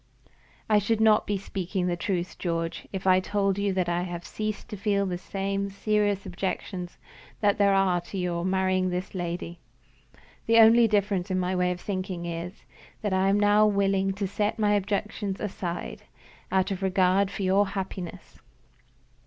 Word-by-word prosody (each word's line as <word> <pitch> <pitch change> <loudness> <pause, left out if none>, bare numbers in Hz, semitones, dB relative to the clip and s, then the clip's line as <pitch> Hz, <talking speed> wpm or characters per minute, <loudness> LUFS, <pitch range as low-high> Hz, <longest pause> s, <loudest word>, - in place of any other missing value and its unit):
I 215 -1 +4
should 220 +2 0
not 220 -1 +4
be 205 - 0
speaking 190 -1 -3
the 175 -1 0
truth, 180 0 -3
George, 165 -2 -3
if 190 -1 -5
I 185 -1 +5
told 195 0 0
you 200 0 +1
that 185 -2 0
I 175 0 0
have 175 -1 -5
ceased 215 -1 -4
to - - -5
feel 200 0 0
the 180 -2 -3
serious 200 +1 -1
objections 180 -1 -4 0.4
that 205 0 +2
there 200 -1 +4
are 185 -2 +2
to 185 +3 -8
your 175 -2 -1
marrying 185 0 +1
this 180 +1 -4
lady. 175 -1 -4 0.9
The 230 0 +5
only 230 +1 +7
difference 200 -3 0
in 185 0 0
my 185 +1 -1
way 180 0 +2
of 180 0 -3
thinking 185 -2 -4
is, 170 +2 -6 0.4
that 205 -2 0
I 190 +1 +3
am 200 +1 +3
now 205 +1 +5
willing 195 -1 +1
to 200 0 -2
set 205 +2 -1
my 210 -2 +2
objections 205 0 -2
aside, 180 -4 -4 0.5
out 190 +1 +1
of 190 -1 -3
regard 190 0 +2
for 200 0 -5
your 195 +2 +3
happiness. 190 -2 -6
195 Hz, 170 wpm, -27 LUFS, 180-205 Hz, 0.9 s, only